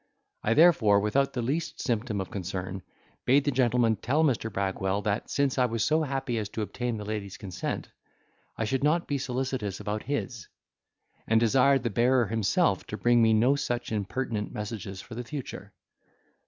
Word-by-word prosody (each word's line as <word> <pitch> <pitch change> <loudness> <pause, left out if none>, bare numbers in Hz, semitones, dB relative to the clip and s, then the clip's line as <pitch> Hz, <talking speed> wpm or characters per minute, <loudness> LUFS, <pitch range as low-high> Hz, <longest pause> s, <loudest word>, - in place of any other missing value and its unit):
I 115 - +1
therefore, 125 -12 +6
without 130 +7 +1
the 120 - -2
least 150 +7 -2
symptom 115 -3 -1
of 95 - -5
concern 95 0 -4 0.4
bade 135 +3 +4
the 145 - +1
gentleman 120 -3 +2
tell 140 +10 +1
Mr. 120 -6 +1
Bragwell, 95 0 -1
that 105 0 -1
since 140 -2 +1
I 125 - +4
was 115 -2 -1
so 155 +2 +2
happy 135 -5 -2
as 105 -2 -4
to 110 - -3
obtain 120 +2 -3
the 105 - -6
lady's 105 0 -4
consent, 100 -7 -5 0.7
I 110 - -1
should 135 +5 -1
not 160 +4 +2
be 140 -1 -1
solicitous 125 -6 -3
about 105 +1 -3
his; 125 - -4 0.8
and 110 0 +4
desired 130 +4 +4
the 120 - -1
bearer 120 +3 +3
himself 110 -1 +1
to - - -5
bring 120 0 +4
me 110 -1 +5
no 125 +6 +4
such 120 -4 -3
impertinent 110 +1 -2
messages 105 -2 -5
for 120 - -11
the 120 +2 -5
future. 135 +2 -7
115 Hz, 175 wpm, -28 LUFS, 105-130 Hz, 0.8 s, therefore